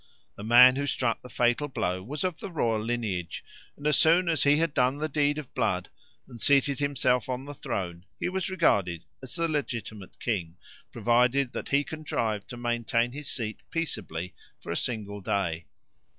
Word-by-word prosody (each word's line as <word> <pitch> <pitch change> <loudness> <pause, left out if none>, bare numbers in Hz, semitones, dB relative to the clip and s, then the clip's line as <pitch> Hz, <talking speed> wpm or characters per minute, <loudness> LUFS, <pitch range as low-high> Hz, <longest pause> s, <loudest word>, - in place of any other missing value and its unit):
The 100 - -9
man 125 +3 +8
who 140 0 -1
struck 120 -4 0
the 125 - -11
fatal 120 +5 +1
blow 95 -9 -2
was 140 +9 -4
of 180 -3 -2
the - - -6
royal 115 -10 0
lineage, 110 -8 -3 0.3
and 145 - -11
as 150 - +4
soon 170 +2 +5
as 160 -5 +2
he 145 +1 +5
had 165 -2 +1
done 130 +2 +2
the 155 +1 -1
deed 145 0 +1
of 150 -4 -7
blood 90 -5 0 0.4
and 120 -2 -11
seated 140 0 +3
himself 130 -4 +1
on 130 +1 -3
the 145 - -7
throne 90 -8 -4
he - - -1
was 190 +1 -2
regarded 100 - +1 0.2
as 130 -2 -7
the 170 0 +1
legitimate 115 - -4
king, 90 -7 -2 0.3
provided 125 +2 +2
that - - -5
he 140 +1 +3
contrived 115 -10 -3
to 120 - -8
maintain 120 0 0
his 145 +1 -6
seat 110 -3 -3
peaceably 95 - -3 0.3
for - - -7
a - - -1
single 105 -2 -2
day. 85 -4 -1
125 Hz, 180 wpm, -28 LUFS, 105-145 Hz, 0.4 s, man